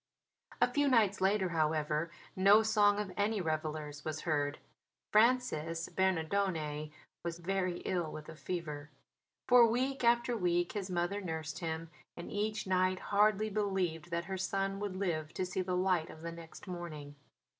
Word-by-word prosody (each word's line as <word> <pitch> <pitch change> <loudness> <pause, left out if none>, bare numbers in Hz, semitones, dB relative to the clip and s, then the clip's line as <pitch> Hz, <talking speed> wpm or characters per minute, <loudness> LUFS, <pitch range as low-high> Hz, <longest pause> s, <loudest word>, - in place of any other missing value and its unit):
A 245 - +5
few 285 +3 +1
nights 215 -7 +3
later, 190 -1 +2
however, 155 -1 0 0.3
no 200 +3 +6
song 210 -2 +4
of 205 -3 -3
any 205 +1 +1
revellers 155 -3 -3
was 155 -1 -4
heard. 145 -2 0 0.5
Francis 210 -9 +2
Bernardone 165 -4 0 0.3
was 170 -1 -3
very 185 0 -1
ill 175 -4 -1
with 155 0 -8
a 160 - -9
fever. 150 -4 -5 0.6
For 245 -1 +8
week 255 +4 0
after 240 +1 +3
week 175 -4 +1
his 200 -3 -4
mother 180 +3 -1
nursed 160 -2 -4
him; 165 -1 -4 0.3
and 170 - -7
each 215 +1 -1
night 185 0 +2 0.2
hardly 210 +1 +3
believed 190 -6 -1
that 170 0 -2
her 190 0 -4
son 195 +1 -1
would 205 -2 -3
live 170 -5 -2
to 185 - -1
see 185 +1 -2
the 180 0 -1
light 180 -3 +1
of 160 - -11
the 170 - -4
next 165 +2 -11
morning. 160 -5 -6
180 Hz, 155 wpm, -33 LUFS, 160-205 Hz, 0.6 s, For